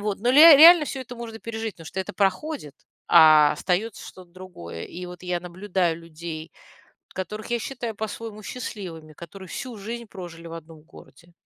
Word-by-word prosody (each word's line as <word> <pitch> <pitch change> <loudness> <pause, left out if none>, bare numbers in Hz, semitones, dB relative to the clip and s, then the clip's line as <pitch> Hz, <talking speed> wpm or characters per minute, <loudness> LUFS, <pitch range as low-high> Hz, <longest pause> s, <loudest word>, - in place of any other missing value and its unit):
вот, 205 -1 -3
но 240 +4 +1
ле 310 +4 +9
реально 330 +1 +9
всё 270 - -5
это 250 -1 -9
можно 225 -1 -8
пережить, 225 -1 -5
потому 165 - -13
что 190 - -4
это 190 - -6
проходит, 195 - -2 0.3
а 155 -3 +7
остается 190 +7 -2
что-то 180 -2 -14
другое. 170 - -10
И 180 0 -8
вот 180 0 -11
я 180 -1 -2
наблюдаю 180 -1 -2
людей, 165 -1 -8 0.6
которых 210 +3 -6
я 240 - 0
считаю 240 -3 -5
по-своему 220 0 -7
счастливыми, 180 -9 -8
которые 180 +4 -11
всю 245 +1 -7
жизнь 235 +4 -6
прожили 175 -4 -10
в - - -10
одном 160 -1 -11
городе. 170 +2 -18
185 Hz, 175 wpm, -24 LUFS, 170-225 Hz, 0.6 s, ле